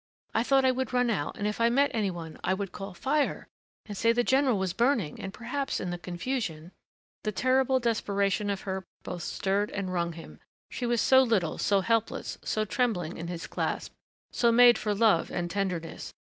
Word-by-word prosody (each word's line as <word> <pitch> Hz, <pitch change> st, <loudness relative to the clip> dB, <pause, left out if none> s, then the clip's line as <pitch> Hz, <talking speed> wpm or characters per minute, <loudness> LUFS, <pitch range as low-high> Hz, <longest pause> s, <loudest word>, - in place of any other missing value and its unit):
I 220 Hz, -, +2 dB
thought 270 Hz, +2 st, +3 dB
I 260 Hz, -, +5 dB
would 255 Hz, -1 st, -3 dB
run 245 Hz, -1 st, +2 dB
out 145 Hz, -9 st, -2 dB
and 205 Hz, -, -3 dB
if 210 Hz, +2 st, -2 dB
I 230 Hz, -, +5 dB
met 275 Hz, +4 st, +3 dB
any 215 Hz, -4 st, +1 dB
one 165 Hz, -3 st, -7 dB
I 190 Hz, -, +1 dB
would 195 Hz, -1 st, -4 dB
call, 195 Hz, -2 st, -7 dB
'Fire', 290 Hz, -, 0 dB, 0.4 s
and 205 Hz, -, -7 dB
say 230 Hz, +4 st, +3 dB
the 240 Hz, +1 st, +2 dB
general 265 Hz, -3 st, +3 dB
was 190 Hz, -2 st, -1 dB
burning 230 Hz, -, +1 dB
and 195 Hz, -, -5 dB
perhaps 255 Hz, +6 st, -3 dB
in 180 Hz, -, -3 dB
the 175 Hz, -, -4 dB
confusion 175 Hz, -3 st, -4 dB, 0.3 s
" -, -, -73 dB
The 215 Hz, -, -1 dB
terrible 260 Hz, +3 st, +2 dB
desperation 205 Hz, -3 st, 0 dB
of 200 Hz, -1 st, -2 dB
her 190 Hz, -1 st, -4 dB, 0.2 s
both 180 Hz, -1 st, -5 dB
stirred 200 Hz, +5 st, -1 dB
and 190 Hz, -2 st, -4 dB
wrung 170 Hz, -1 st, -1 dB
him. 165 Hz, 0 st, -11 dB, 0.3 s
She 245 Hz, -, -3 dB
was 235 Hz, -2 st, +2 dB
so 260 Hz, 0 st, +6 dB
little, 220 Hz, -10 st, +1 dB
so 200 Hz, -1 st, +2 dB
helpless, 225 Hz, +2 st, -1 dB
so 215 Hz, 0 st, -1 dB
trembling 210 Hz, -8 st, -1 dB
in 165 Hz, -, -5 dB
his 170 Hz, -1 st, -5 dB
clasp... -, -, -3 dB, 0.4 s
so 235 Hz, -1 st, +3 dB
made 240 Hz, 0 st, +7 dB
for 210 Hz, -1 st, -1 dB
love 210 Hz, -5 st, +3 dB
and 175 Hz, -1 st, -3 dB
tenderness.... 180 Hz, -4 st, -3 dB
210 Hz, 205 wpm, -28 LUFS, 185-245 Hz, 0.4 s, made